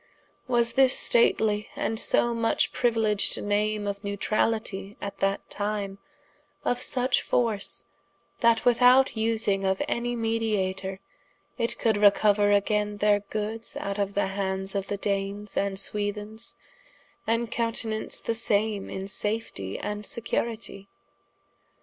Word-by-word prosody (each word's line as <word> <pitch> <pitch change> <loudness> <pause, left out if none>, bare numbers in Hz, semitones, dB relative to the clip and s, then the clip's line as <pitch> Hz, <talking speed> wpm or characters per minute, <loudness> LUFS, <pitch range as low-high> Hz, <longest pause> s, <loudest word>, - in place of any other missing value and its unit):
Was 235 -2 +2
this 265 -1 +5
stately, 215 -2 +2
& 225 - 0
so 235 +1 +2
much 230 -1 +1
priuiledged 225 -4 +1
name 210 +1 0
of 200 0 -3
Newtralitie 205 0 -1
at 200 - -6
that 195 0 0
time, 205 -1 -3 0.7
of 245 0 0
such 255 -1 +1
force, 220 -5 0 0.6
that 230 -1 +3
without 250 +2 +6
vsing 220 -3 0
of 190 0 +1
any 240 +1 -1
mediatour, 210 -5 -1 0.6
it 230 - -1
could 220 -3 +2
recouer 205 0 +4
againe 210 0 +1
their 205 0 +3
goods 215 +2 -5
out 200 +1 -3
of 200 0 -1
the 205 - +2
hands 190 0 -2
of 200 -1 -2
the 205 - -2
Danes 200 0 -2
& - - -14 0.2
Swethens, 210 +2 -2 0.4
& 230 0 -3
countenance 230 -1 -1
the 230 - -1
same 215 -2 0
in 190 - -5
safetie, 195 - -3
& - - -20 0.2
securitie? 220 -2 -3
210 Hz, 125 wpm, -27 LUFS, 200-230 Hz, 0.7 s, without